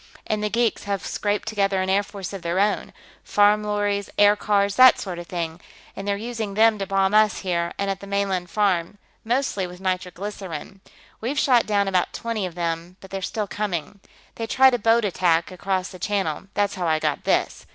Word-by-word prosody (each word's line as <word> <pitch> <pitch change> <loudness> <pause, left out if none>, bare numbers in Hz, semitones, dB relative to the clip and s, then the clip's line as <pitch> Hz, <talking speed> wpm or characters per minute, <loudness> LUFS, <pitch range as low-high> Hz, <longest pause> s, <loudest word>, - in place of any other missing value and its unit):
And 215 -1 -1
the 210 - 0
geeks 230 +1 0
here 200 - -1
have 195 - -4
scraped 205 +1 -2
together 200 -3 +1
an 185 - -1
air 195 +1 +3
force 200 -2 -8
of 195 - -6
their 170 +2 -1
own 205 +1 +1 0.3
farm 210 +1 +3
lorries, 205 -1 -1
aircars, 205 -1 +3
that 255 0 +8
sort 180 -3 -5
of 175 - -8
thing 170 -1 -4 0.3
and 195 - -6
they're 200 0 0
using 220 -2 -4
them 220 0 +4
to 195 - -3
bomb 195 +1 +1
us 215 -1 +4
here 170 -2 -1
and 200 - -1
at 195 - -4
the 200 - -10
mainland 195 -3 -1
farm, 195 -2 0 0.3
mostly 235 -5 0
with 180 0 -11
nitroglycerine. 185 -1 -5 0.4
We've 255 +6 -2
shot 250 -5 +3
down 200 -2 +2
about 185 -2 +1
twenty 225 -4 -3
of 170 - -11
them, 170 +1 -3
but 190 - -14
they're 195 0 -4
still 210 +3 -2
coming. 200 -2 -4 0.4
They 225 - -3
tried 265 +2 +5
a 245 - +1
boat 225 +1 +3
attack 170 -3 +1
across 185 0 -2
the 185 - -11
Channel; 195 -3 -2
that's 205 -1 +1
how 180 -3 -2
I 160 -1 +3
got - - -1
this. - - 0
200 Hz, 205 wpm, -23 LUFS, 185-210 Hz, 0.4 s, that